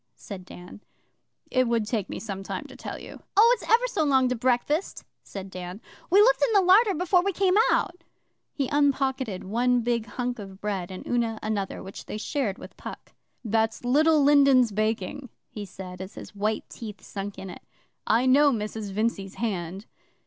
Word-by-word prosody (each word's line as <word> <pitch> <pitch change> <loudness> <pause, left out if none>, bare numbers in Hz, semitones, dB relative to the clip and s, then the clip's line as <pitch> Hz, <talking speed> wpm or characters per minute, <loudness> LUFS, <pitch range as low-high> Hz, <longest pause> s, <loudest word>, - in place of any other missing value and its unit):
said 185 -3 -9
Dan. 180 +3 -12 0.7
'It 255 -1 +3
would 230 -2 +1
take 210 -3 -2
me - - -5
some 195 -3 -5
time 195 - -5
to - - -12
tell - - -6
you.' - - -11 0.2
'Oh, 455 +3 +8
it's - - -10
ever 475 +2 +5
so 420 -10 0
long 265 -3 +3
to 250 - 0
breakfast,' 255 - 0 0.2
said 195 -1 -8
Dan. 180 +1 -7 0.3
'We 390 +4 +6
looked - - +4
in 455 - +3
the 400 - +6
larder 390 +3 +5
before 360 +2 +3
we 395 +2 0
came 380 0 +2 0.2
out.' 350 -1 0 0.5
He 275 -3 -2
unpocketed 270 -7 +1
one 245 +4 +1
big 235 -1 -1
hunk 245 -1 -3
of 195 -2 -9
bread 195 -4 -3
and 185 -1 -8
Una 230 -2 0
another, 205 -3 -3
which 190 - -9
they - - -4
shared 220 -3 -2
with - - -11
Puck. - - -9 0.3
'That's 225 +2 0
Little 300 +4 +4
Lindens' 275 -4 +5
baking,' 215 +5 -2 0.2
he 210 -2 -6
said, 185 -1 -9
as 190 +2 -8
his - - -10
white 210 +2 -2
teeth 210 -4 -9
sunk 200 0 -6
in 190 - -7
it. - - -11 0.5
'I 230 +3 +3
know 285 +3 +5
Mrs 215 -2 -3
Vincey's 200 -1 -2
hand. 190 -3 -3
230 Hz, 185 wpm, -26 LUFS, 200-280 Hz, 0.7 s, Oh